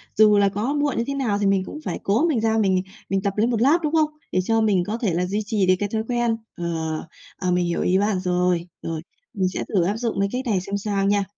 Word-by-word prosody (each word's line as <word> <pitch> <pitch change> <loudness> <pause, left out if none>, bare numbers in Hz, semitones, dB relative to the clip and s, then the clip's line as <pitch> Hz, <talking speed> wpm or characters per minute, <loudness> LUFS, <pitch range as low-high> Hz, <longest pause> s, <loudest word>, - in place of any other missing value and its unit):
dù 210 -1 +6
là 200 -1 +4
có 220 +8 -2
muộn 290 -1 0
như 230 - +1
thế 280 - -1
nào 230 -7 0
thì 205 - 0
mình 195 -1 +3
cũng 300 - -7
phải - - -3
cố 220 +11 +2
mình 275 -8 +1
ra 225 0 +2
mình, 190 -3 +2
à, 190 - -20 0.2
mình 195 0 +1
tập 200 -1 -1
lấy 220 +3 +3
một 230 -2 0
lát, 290 +7 +5
đúng 305 +1 -1
không? 310 -2 +3 0.2
Để 185 - +1
cho 225 +2 +2
mình 200 -5 +2
có 220 +2 -2
thể 210 -8 -1
là 180 +2 0
duy 200 +3 -1
trì 205 -2 +1
được 185 - +6
cái 205 -1 -1
thói 220 0 -1
quen. 240 -2 +1 0.2
Ờ, 175 - -4 0.7
ờ, 185 -1 -1
mình 180 0 +2
hiểu 170 0 -1
ý 185 +1 +2
bạn 205 -1 +1
rồi. 180 -1 0
Rồi, 165 -1 -4 0.3
mình 190 -2 0
sẽ - - -3
thử 185 - +3
áp 200 +5 0
dụng 230 -4 -2
cái 200 0 +1
cách 255 +2 -3
này 200 -6 +1
xem 200 +2 -3
sao 200 -1 -1
nha. 200 0 +2
205 Hz, 285 wpm, -23 LUFS, 185-225 Hz, 0.7 s, dù